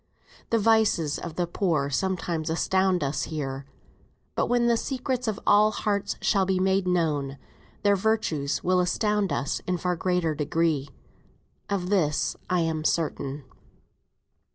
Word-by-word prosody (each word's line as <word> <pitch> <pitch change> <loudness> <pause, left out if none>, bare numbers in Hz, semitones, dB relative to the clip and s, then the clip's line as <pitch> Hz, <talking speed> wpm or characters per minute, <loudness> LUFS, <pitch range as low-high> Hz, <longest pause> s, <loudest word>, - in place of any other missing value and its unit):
The 230 - +3
vices 215 -9 +2
of 170 -2 -7
the 175 - 0
poor 165 -5 0
sometimes 170 -1 -1
astound 185 +1 +1
us 140 +1 -1
here; 135 -3 -5 0.7
but - - 0
when 240 -1 +2
the 235 0 +4
secrets 255 0 -2
of 215 -2 -1
all 210 +1 +5
hearts 205 -1 -1
shall 195 -3 +2
be 190 0 +1
made 190 0 +2
known, 150 -6 0 0.5
their 205 -1 +4
virtues 185 -9 0
will 185 0 +3
astound 210 +2 +1
us 140 - -1
in 180 -1 0
far 180 +1 -1
greater 180 -2 0
degree. 150 -1 0 0.8
Of 190 -2 -2
this 155 -7 +1
I 180 -1 +2
am 160 -1 -1
certain. 145 -3 -1
180 Hz, 140 wpm, -26 LUFS, 155-200 Hz, 0.8 s, all